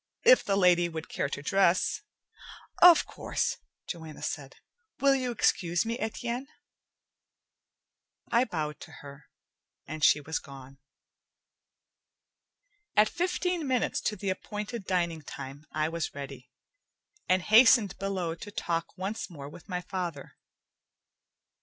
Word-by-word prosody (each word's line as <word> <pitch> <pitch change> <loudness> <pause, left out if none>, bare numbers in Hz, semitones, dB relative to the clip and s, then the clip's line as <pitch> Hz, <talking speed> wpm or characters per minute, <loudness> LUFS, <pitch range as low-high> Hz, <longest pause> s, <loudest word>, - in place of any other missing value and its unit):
"If - - +7
the 200 - 0
lady 175 -2 +4
would 160 -1 -7
care 140 - -2
to 145 - -5
dress 190 +2 +2 0.4
" - - -16
"Of 335 - +1
course," - - -2 0.3
Joanna 160 -3 -7
said. 135 -3 -4 0.4
"Will 275 0 +5
you 255 -2 0
excuse 175 -6 +1
me, 230 +2 -3
Etienne?" 235 +4 -3 1.8
I 235 +2 +4
bowed 155 - -4
to - - -11
her, 140 0 -12 0.6
and 155 0 -6
she 150 - +6
was 150 +1 -3
gone. 135 0 -13 2.2
At 210 +1 +6
fifteen 360 -2 -1
minutes 255 -2 0
to 210 - -1
the 195 -1 -2
appointed 210 +2 -5
dining 170 -3 0
time, 140 +1 -9
I 155 0 0
was 165 -2 -4
ready, 135 -3 -8 0.8
and 185 0 +3
hastened 220 -2 +6
below 190 -4 -2
to 170 +5 -9
talk 170 -3 -3
once 195 +4 -4
more 145 -5 -9
with 160 +5 -14
my 180 -1 -2
father. 175 -6 -5
180 Hz, 130 wpm, -29 LUFS, 155-215 Hz, 2.2 s, If